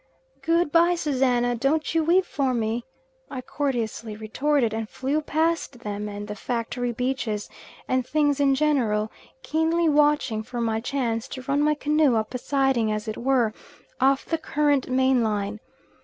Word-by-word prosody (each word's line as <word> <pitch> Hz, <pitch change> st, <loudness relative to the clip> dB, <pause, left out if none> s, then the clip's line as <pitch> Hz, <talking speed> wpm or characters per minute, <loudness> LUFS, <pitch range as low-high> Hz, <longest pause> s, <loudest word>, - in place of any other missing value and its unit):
"Good 335 Hz, -1 st, +1 dB
bye, 340 Hz, +2 st, +4 dB
Susannah, 255 Hz, -6 st, +1 dB
don't 275 Hz, +7 st, 0 dB
you 325 Hz, -1 st, +2 dB
weep 360 Hz, +4 st, +3 dB
for 270 Hz, -3 st, -1 dB
me," 230 Hz, +1 st, -1 dB, 0.4 s
I 260 Hz, -2 st, -5 dB
courteously 235 Hz, -6 st, -3 dB
retorted; 235 Hz, +3 st, 0 dB
and 220 Hz, -1 st, -3 dB
flew 280 Hz, +4 st, -1 dB
past 315 Hz, -4 st, -1 dB
them 210 Hz, -1 st, -4 dB
and 205 Hz, 0 st, -6 dB
the 210 Hz, -, -4 dB
factory 240 Hz, +2 st, -3 dB
beaches 240 Hz, -4 st, -2 dB, 0.4 s
and 255 Hz, 0 st, +1 dB
things 290 Hz, +1 st, +1 dB
in 275 Hz, -1 st, +4 dB
general, 240 Hz, -8 st, +1 dB, 0.3 s
keenly 325 Hz, +2 st, +1 dB
watching 295 Hz, -7 st, +2 dB
for 240 Hz, +2 st, -6 dB
my 225 Hz, -1 st, 0 dB
chance 245 Hz, -2 st, -2 dB
to 260 Hz, -1 st, -7 dB
run 280 Hz, +2 st, 0 dB
my 300 Hz, 0 st, +3 dB
canoe 295 Hz, -3 st, +2 dB
up 220 Hz, +2 st, -1 dB
a 250 Hz, -, -2 dB
siding, 270 Hz, -5 st, +1 dB
as 215 Hz, 0 st, -3 dB
it 215 Hz, -, -3 dB
were, 245 Hz, -3 st, +1 dB, 0.5 s
off 270 Hz, +1 st, +3 dB
the 325 Hz, -, -1 dB
current 290 Hz, -4 st, +1 dB
main 260 Hz, 0 st, +3 dB
line. 210 Hz, -1 st, -1 dB
260 Hz, 160 wpm, -25 LUFS, 225-295 Hz, 0.5 s, bye